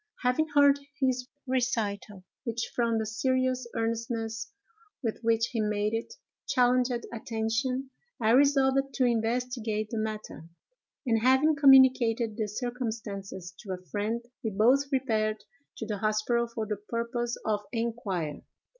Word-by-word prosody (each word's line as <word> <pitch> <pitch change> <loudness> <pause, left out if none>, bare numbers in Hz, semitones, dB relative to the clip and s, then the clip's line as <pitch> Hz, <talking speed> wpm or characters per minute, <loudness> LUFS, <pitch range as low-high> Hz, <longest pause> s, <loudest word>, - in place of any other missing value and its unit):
Having 250 +6 +2
heard 285 -1 +6 0.2
his 255 -2 0 0.2
recital, 225 -6 -1 0.2
which, 230 -2 -3
from 230 -2 +1
the 220 - -1
serious 255 +3 0
earnestness 230 0 -2 0.5
with 225 -2 -2
which 230 0 +2
he 230 -3 -1
made 210 0 0
it, 230 - -3 0.3
challenged 250 0 +3 0.2
attention, 235 +4 -2 0.3
I 220 -1 +3
resolved 275 0 +3
to 255 - +3
investigate 230 -2 -1
the 225 - -2
matter; 215 -7 -5 0.6
and, 225 -3 +2
having 265 +5 +4
communicated 255 -5 +5
the 215 -1 -1
circumstances 210 -6 -5
to 195 -4 -5
a 180 0 -8
friend, 220 +3 -2 0.2
we 220 - 0
both 250 +8 +3
repaired 220 -5 0 0.3
to 225 - -4
the 210 -2 -3
hospital 215 +3 +1
for 230 -1 -4
the 210 -1 -3
purpose 235 +3 -3
of 210 -1 +1
inquiry. 210 - -3
230 Hz, 130 wpm, -29 LUFS, 215-255 Hz, 0.6 s, heard